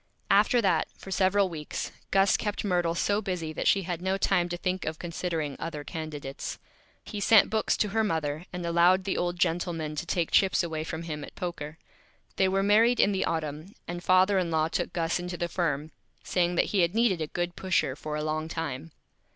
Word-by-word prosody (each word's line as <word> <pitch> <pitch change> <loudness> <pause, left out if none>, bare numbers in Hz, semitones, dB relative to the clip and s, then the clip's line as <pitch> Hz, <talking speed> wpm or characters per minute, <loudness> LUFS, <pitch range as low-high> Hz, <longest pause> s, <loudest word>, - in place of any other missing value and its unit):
After 215 +4 +4
that, 175 -5 +2
for 195 - -10
several 195 +1 +3
Weeks, 155 -4 -5 0.2
Gus 195 0 +4
kept 210 0 -2
Myrtle 175 -3 +1
so 205 +4 +1
Busy 180 -6 -3
that - - -2
she 195 - +4
had 175 -1 -4
no 190 +1 0
Time 175 -2 +1
to 175 - -3
think 185 0 -2
of 155 0 -3
considering 165 -4 -3
other 155 -3 -5
Candidates. 150 -3 -6 0.5
He 210 - -6
sent 215 +1 +5
Books 220 0 +1
to 210 - +1
her 220 +2 +1
Mother, 160 -4 -2
and 180 -1 -5
allowed 175 +3 +4
the 195 - -1
Old 175 0 -1
Gentleman 165 -3 -1
to 170 - -3
take 170 -2 0
Chips 190 -2 +4
away 160 -2 -3
from 160 +1 -5
him 150 -3 -5
at - - -10
Poker. 160 -3 -5 0.6
They 190 - +4
were 195 +1 +1
Married 225 +4 +4
in 205 - +5
the 190 - 0
Autumn, 155 +3 -4
and 175 +1 -5
Father 185 +2 +4
in 180 -2 -1
Law 160 -1 +1
took - - -2
Gus 165 0 -1
into 175 0 -5
the 175 - -1
Firm, 160 -3 -2 0.3
saying 175 -1 +1
that - - +3
he 200 - +3
had 175 +2 +2
needed 225 -7 +2
a 155 - -1
good 175 +2 -3
Pusher 185 -8 0
for 150 0 -5
a 150 - -2
Long 155 +1 -2
Time. 160 -2 -4
175 Hz, 210 wpm, -28 LUFS, 160-190 Hz, 0.6 s, sent